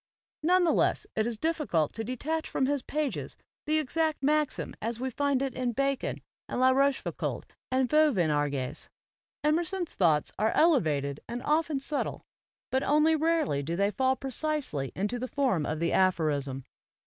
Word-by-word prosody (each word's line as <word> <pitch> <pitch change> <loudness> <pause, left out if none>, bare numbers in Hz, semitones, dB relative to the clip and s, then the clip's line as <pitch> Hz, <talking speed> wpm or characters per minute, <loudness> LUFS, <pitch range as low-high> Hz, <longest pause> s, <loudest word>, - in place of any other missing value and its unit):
None 360 +3 +4
the 335 - +3
less - - +1
is 220 +1 +1
it - - -23
difficult 300 - 0
to 225 - -4
detach 295 +7 -3
from 265 - 0
his 285 0 0
pages 295 +1 -3 0.3
the 310 +1 +2
exact 310 +1 0
maxim 300 +1 0
as 230 +1 -3
we 260 +1 -2
find 280 +1 +1
it 270 - -2
in 250 -2 -2
Bacon 275 +1 -1 0.3
and - - -2
La 260 0 +5
Rochefoucauld 275 +1 0 0.3
and 260 0 +2
Vauvenargues. 155 - +1 0.5
Emerson's 345 +4 0
thoughts 155 -5 +2
are 215 +1 +3
elevated 150 - +2
and 245 +2 -4
often 305 -1 +1
sub 280 +1 -1
tle, - - -8 0.5
but 265 - +2
only 305 +3 +3
rarely 315 - +1
do 165 +4 -3
they 200 +3 +1
fall 260 +6 +1
precisely 265 - -2
into 210 +6 -2
the 255 - -3
form 255 - 0
of 155 - -2
the 170 0 0
aphorism. 145 -8 +1
260 Hz, 160 wpm, -29 LUFS, 185-305 Hz, 0.5 s, La